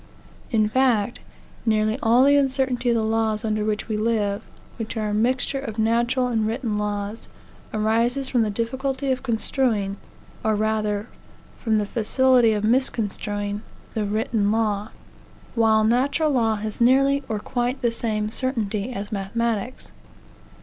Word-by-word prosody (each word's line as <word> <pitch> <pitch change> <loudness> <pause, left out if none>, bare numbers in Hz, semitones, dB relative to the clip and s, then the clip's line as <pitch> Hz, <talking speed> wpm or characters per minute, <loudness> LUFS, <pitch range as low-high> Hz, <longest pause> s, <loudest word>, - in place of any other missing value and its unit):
In 215 -3 +2
fact, 240 -2 +1 0.4
nearly 215 +1 +1
all 240 +1 +5
the 285 +1 +5
uncertainty 265 -3 +1
of 235 - +3
the 225 - +1
laws 220 0 0
under 215 -1 0
which 210 -1 -2
we 215 -2 -1
live, 210 -2 0 0.4
which 225 0 -5
are 215 -1 -1
a - - -2
mixture 250 +5 +1
of 230 -5 -6
natural 235 +3 +2
and 225 -3 0
written 225 -2 -2
laws, 205 +1 -4 0.4
arises 230 +5 +1
from 250 -3 +2
the 220 - +1
difficulty 260 +5 -2
of 255 0 -1
construing, 225 -4 0 0.5
or, 220 -1 +2
rather, 215 0 0 0.5
from 220 -2 +1
the 210 - +1
facility 245 +2 +3
of 210 -1 -2
misconstruing, 210 -4 0 0.3
the 220 - -1
written 210 0 0
law; 215 -2 0 0.6
while 220 -2 +4
natural 270 +7 +2
law 225 -5 +2
has 215 +2 -5
nearly 275 +3 +4
or 220 - -1
quite 245 +4 -2
the 235 - +3
same 215 -2 -2
certainty 225 -4 -2
as 205 -3 -5
mathematics. 225 +3 -2
225 Hz, 145 wpm, -23 LUFS, 215-250 Hz, 0.6 s, all